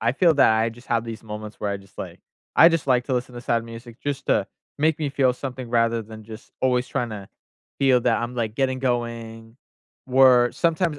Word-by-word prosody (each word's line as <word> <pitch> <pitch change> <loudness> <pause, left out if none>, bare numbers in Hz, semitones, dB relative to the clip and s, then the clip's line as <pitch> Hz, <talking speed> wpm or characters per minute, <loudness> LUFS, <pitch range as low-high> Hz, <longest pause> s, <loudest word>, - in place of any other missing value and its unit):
I 115 +2 +1
feel 165 +3 +3
that 135 -5 +5
I 115 - +2
just 120 +2 -13
have 115 -3 0
these 115 -1 -7
moments 105 -1 -8
where 105 - -2
I 100 - -2
just, 100 0 -18
like - - -7 0.3
I 165 - +8
just 165 -4 -1
like 125 -2 +2
to 130 - -1
listen 125 0 -3
to 120 - -7
sad 120 -1 0
music 115 0 -11
just 140 -1 -4
to - - +2 0.3
make 155 +1 +2
me 150 -2 -1
feel 135 -2 +2
something 125 -1 -7
rather 115 -1 +2
than 110 0 -11
just 110 +1 -12
always 125 -1 +1
tryna 110 -5 -4 0.5
feel 135 -3 +4
that 115 -1 +2
I'm, 120 +1 -4
like, 115 -3 -2
getting 130 0 0
going, 115 -2 -3 0.5
where 125 -2 +5
sometimes 165 -2 0
120 Hz, 215 wpm, -23 LUFS, 115-135 Hz, 0.5 s, I